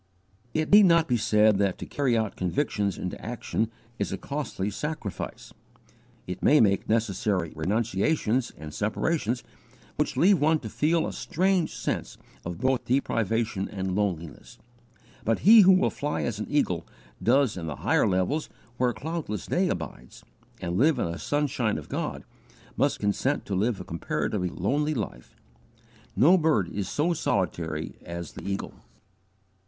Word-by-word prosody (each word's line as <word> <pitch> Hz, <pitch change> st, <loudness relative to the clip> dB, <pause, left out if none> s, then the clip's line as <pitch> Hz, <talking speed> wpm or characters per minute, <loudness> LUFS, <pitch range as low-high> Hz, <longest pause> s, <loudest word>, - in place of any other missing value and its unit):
It 155 Hz, 0 st, 0 dB
need 205 Hz, -1 st, +8 dB
not 170 Hz, -1 st, +4 dB
be 125 Hz, -, +2 dB
said 105 Hz, -2 st, +3 dB
that 100 Hz, -2 st, +1 dB
to -, -, -6 dB
carry 130 Hz, -5 st, 0 dB
out 110 Hz, -3 st, -1 dB
conviction 100 Hz, +1 st, 0 dB
into 90 Hz, -, -5 dB
action 120 Hz, -1 st, -2 dB, 0.3 s
is -, -, -1 dB
a -, -, -2 dB
costly 135 Hz, -9 st, -3 dB
sacrifice. 150 Hz, -, -5 dB, 0.7 s
It 90 Hz, 0 st, -6 dB
may 150 Hz, -, +5 dB
make 100 Hz, -3 st, +2 dB
necessary 100 Hz, -5 st, 0 dB
renunciations 110 Hz, -, 0 dB
and 75 Hz, -1 st, -8 dB
separations 120 Hz, -, -1 dB, 0.5 s
which -, -, -1 dB
leave 190 Hz, 0 st, +5 dB
one 155 Hz, +2 st, +3 dB
to 110 Hz, -, -6 dB
feel 160 Hz, +7 st, +1 dB
a -, -, -4 dB
strange 185 Hz, -1 st, 0 dB
sense -, -, -3 dB, 0.3 s
both 85 Hz, 0 st, -6 dB, 0.2 s
of -, -, -33 dB
deprivation 115 Hz, -5 st, 0 dB
and 95 Hz, -2 st, -3 dB
loneliness. 85 Hz, -7 st, -3 dB, 0.7 s
But 115 Hz, 0 st, 0 dB
he 220 Hz, +3 st, +9 dB
who 190 Hz, -1 st, +7 dB
will 185 Hz, -, +3 dB
fly 145 Hz, +1 st, -2 dB
as 115 Hz, -3 st, -2 dB
an 105 Hz, -, -4 dB
eagle 90 Hz, -, 0 dB, 0.3 s
does 130 Hz, 0 st, +3 dB
into 85 Hz, -3 st, -5 dB
the 75 Hz, -, -4 dB
higher -, -, +3 dB
levels 95 Hz, +12 st, 0 dB, 0.3 s
where 125 Hz, 0 st, +2 dB
cloudless 150 Hz, -, -4 dB
day -, -, +1 dB
abides, 60 Hz, +1 st, -6 dB, 0.4 s
and 85 Hz, +2 st, -2 dB
live 150 Hz, +1 st, +4 dB
in 85 Hz, -, -1 dB
the 85 Hz, -, -6 dB
sunshine 140 Hz, -, 0 dB
of 75 Hz, -, -8 dB
God, -, -, -3 dB, 0.5 s
must -, -, +1 dB
consent 115 Hz, +8 st, 0 dB
to 100 Hz, -, -4 dB
live 105 Hz, +3 st, 0 dB
a -, -, -5 dB
comparatively 90 Hz, +3 st, -2 dB
lonely 145 Hz, -, 0 dB
life. 100 Hz, -, -6 dB, 0.8 s
No 175 Hz, +8 st, +6 dB
bird 150 Hz, -, +2 dB
is 100 Hz, +1 st, -3 dB
so 165 Hz, +4 st, +1 dB
solitary 80 Hz, -, -2 dB
as 85 Hz, -1 st, -6 dB
the -, -, -10 dB
eagle. 100 Hz, 0 st, -3 dB
110 Hz, 155 wpm, -27 LUFS, 95-150 Hz, 0.8 s, he